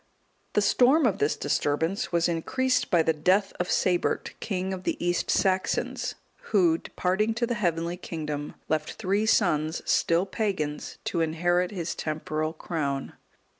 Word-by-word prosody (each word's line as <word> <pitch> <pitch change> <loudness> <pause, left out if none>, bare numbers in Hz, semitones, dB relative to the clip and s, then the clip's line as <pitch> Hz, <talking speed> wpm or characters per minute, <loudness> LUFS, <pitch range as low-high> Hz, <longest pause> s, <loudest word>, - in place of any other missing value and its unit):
The - - +3
storm 270 +5 +4
of 210 -6 +1
this 145 - +2
disturbance 150 - 0
was 170 -1 +2
increased 250 +10 0
by 170 -2 +4
the 160 - +2
death 185 +6 +2
of 180 - -1
Sabert, 180 -2 +1
king 190 -2 -2
of 185 - -5
the - - -1
East 175 0 -1
Saxons, 190 -1 0 0.3
who 175 -6 +4
departing 210 +5 -1
to 240 +1 +1
the 240 - -1
heavenly 170 -5 -1
kingdom, 150 -4 -5
left 155 -1 -1
three 205 +1 0
sons, 160 -7 +2
still 170 +3 +2
pagans, 190 -9 -3
to 170 - -1
inherit 175 +3 +1
his 180 -5 -3
temporal 155 0 -2
crown. 145 -4 -3
175 Hz, 145 wpm, -27 LUFS, 155-195 Hz, 0.3 s, storm